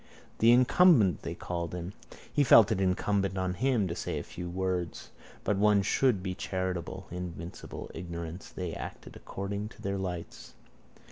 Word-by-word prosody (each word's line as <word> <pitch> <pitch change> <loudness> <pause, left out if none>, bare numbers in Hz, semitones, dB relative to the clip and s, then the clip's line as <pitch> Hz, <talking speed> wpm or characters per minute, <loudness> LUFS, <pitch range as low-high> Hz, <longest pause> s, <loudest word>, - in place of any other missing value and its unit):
The 115 +1 +6
incumbent 125 - +5
they - - -5
called 85 -1 -4
him. 90 +2 -5 0.4
He 145 - +4
felt 115 -4 +7
it 95 - +1
incumbent 95 +1 +1
on 95 -1 0
him 115 0 +1
to 85 - -3
say - - -3
a - - -3
few 90 0 -7
words. 90 -2 -3 0.3
But 105 - +1
one 105 0 +4
should 110 -2 +2
be 95 -1 -2
charitable. 95 0 -3
Invincible 90 -1 -7
ignorance. 85 0 -6
They 90 -3 -5
acted - - -8
according 100 +2 -5
to - - -16
their 100 0 -1
lights. 90 -3 -6
95 Hz, 155 wpm, -30 LUFS, 90-105 Hz, 0.4 s, felt